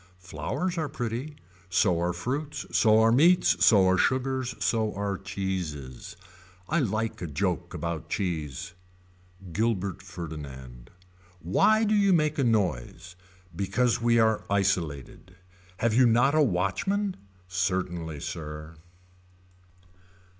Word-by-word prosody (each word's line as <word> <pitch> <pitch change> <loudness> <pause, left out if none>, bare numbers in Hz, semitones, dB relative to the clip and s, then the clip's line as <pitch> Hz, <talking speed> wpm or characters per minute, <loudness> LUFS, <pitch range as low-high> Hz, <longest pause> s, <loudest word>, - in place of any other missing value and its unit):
Flowers 170 - -3
are 155 -2 -2
pretty. 125 +4 -4 0.3
So 90 -1 +2
are 90 +1 +1
fruits. 130 - -4
So 110 -1 +4
are 115 0 +5
meats. 165 +9 +4
So 100 -4 +6
are 95 0 +3
sugars. 130 -1 0
So 110 -2 0
are 100 0 -2
cheeses. 90 -10 -5 0.5
I 170 - +1
like 110 -5 -2
a 85 - -3
joke 90 +2 -2
about 85 0 -4
cheese. 80 - -3 0.8
Gilbert 100 -2 -1
Ferdinand. 70 -9 -9 0.5
Why 215 - +3
do 215 0 +2
you 200 -2 +4
make 155 -3 +1
a - - +3
noise. 90 - -1 0.4
Because 100 +7 0
we 115 0 +3
are 110 -1 +3
isolated. 90 -4 -1 0.4
Have 115 -1 +1
you 125 +2 +5
not 120 +5 +4
a 155 - +4
watchman. 150 - 0 0.3
Certainly 90 -4 -2
sir. 75 -1 -7
100 Hz, 120 wpm, -27 LUFS, 85-125 Hz, 0.8 s, So